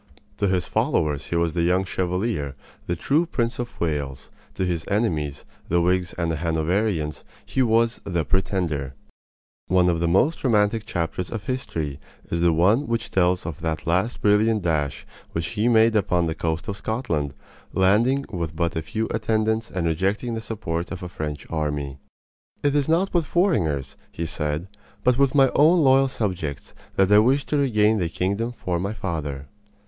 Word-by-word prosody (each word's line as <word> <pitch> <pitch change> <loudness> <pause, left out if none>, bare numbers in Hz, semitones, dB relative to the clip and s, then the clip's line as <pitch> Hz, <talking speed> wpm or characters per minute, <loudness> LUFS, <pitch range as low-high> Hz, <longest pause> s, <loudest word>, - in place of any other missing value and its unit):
To 100 - +1
his 95 -2 +1
followers 75 -3 0
he - - -2
was 85 -1 +1
the 85 - 0
Young 90 +3 +2
Chevalier, 90 - -2 0.3
the 85 - 0
true 150 - +1
Prince 120 -6 -1
of 120 0 -5
Wales; 75 -5 -3 0.2
to 95 - 0
his 85 -3 -1
enemies, 80 - -1 0.2
the 85 - +3
Whigs 90 0 +1
and 85 -1 -1
the 80 - -1
Hanoverians, 80 +1 0 0.2
he 130 - 0
was 115 -1 +2
"the 85 -5 -1
Pretender." 85 -7 -1 0.7
One 90 -1 +4
of 85 -1 +1
the 85 - +1
most 120 - +2
romantic 110 -2 +2
chapters 85 -3 -2
of 110 -4 -4
history 80 - -3 0.3
is 85 - 0
the 85 0 +4
one 100 - +3
which 115 0 -2
tells 90 -1 +2
of 85 -1 -5
that 80 -1 -3
last 90 +8 0
brilliant 105 0 +3
dash 75 -4 -1 0.3
which 80 -3 -2
he 105 +10 0
made 115 -1 +5
upon 90 -4 +2
the 80 - -1
coast 80 +6 -2
of 100 -2 -3
Scotland, 85 - -2 0.4
landing 115 +9 +3
with 85 -4 -3
but 85 -1 -1
a 80 - -1
few 110 +8 -3
attendants 110 0 0
and 90 -2 -2
rejecting 95 +8 0
the 115 - -3
support 95 -7 -4
of 95 -1 -6
a 90 - -5
French 75 -4 -5
army. 75 -3 -2 0.6
"It 145 -1 +2
is 145 0 +1
not 175 +4 +2
with 170 -4 +1
foreigners," 80 - +1
he 85 - -4
said, 75 +2 -3 0.4
"but 125 +1 +3
with 140 0 +3
my 135 -2 +5
own 160 +3 +5
loyal 135 0 +5
subjects, 90 - -3 0.2
that 95 +1 +3
I 105 - +8
wish 130 +6 +3
to 150 - 0
regain 110 -6 +3
the 85 -3 0
kingdom 100 +7 -1
for 90 -7 -3
my 100 +4 -2
father." 75 -9 -4
95 Hz, 175 wpm, -24 LUFS, 80-115 Hz, 0.7 s, I